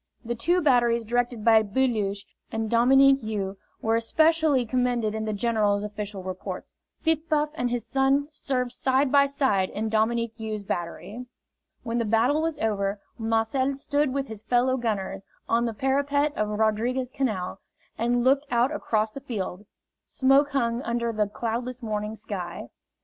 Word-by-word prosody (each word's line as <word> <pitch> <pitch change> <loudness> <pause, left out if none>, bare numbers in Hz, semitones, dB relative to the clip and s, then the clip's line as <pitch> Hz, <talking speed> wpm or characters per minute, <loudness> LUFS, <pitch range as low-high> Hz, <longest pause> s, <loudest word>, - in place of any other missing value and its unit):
The 240 - -1
two 345 +10 +1
batteries 240 -4 +3
directed 240 -1 -1
by 225 -1 +7
Beluche 210 -3 0 0.3
and 225 -1 -3
Dominique 270 +3 +5
You 200 -3 -4 0.2
were 225 - +2
especially 310 +3 +3
commended 240 -2 0
in 220 0 -3
the 215 - -1
general's 210 -1 +1
official 210 -2 -6
reports. 185 0 -6 0.3
Piff 320 0 0
Paff 300 -1 +2
and 245 -6 -1
his 240 -2 -2
son 270 +3 +2
served 255 -4 -2
side 260 +2 +1
by 280 -1 +5
side 260 -9 +1
in 220 +1 -3
Dominique 225 +1 +1
You's 215 -2 -4
battery. 200 +7 -5 0.6
When 235 0 -2
the 230 - 0
battle 235 +8 +2
was 325 -1 -1
over, 200 -2 -1 0.2
Marcel 225 +5 0
stood 285 0 0
with 275 0 -2
his 220 -2 -7
fellow 250 +3 +2
gunners 200 -5 -3 0.2
on 235 +1 +2
the 230 - -2
parapet 285 +3 +1
of 210 0 -1
Rodriguez 220 +4 0
Canal 215 -10 -2 0.4
and 240 +1 +1
looked 275 +3 +3
out 245 +2 +2
across 220 -7 0
the 275 - -8
field 205 -6 -5 0.4
smoke 275 +2 +3
hung 235 -3 0
under 235 -1 -1
the 210 -1 +1
cloudless 240 +4 -4
morning 210 -1 -3
sky. 180 - -6
235 Hz, 155 wpm, -26 LUFS, 215-265 Hz, 0.6 s, by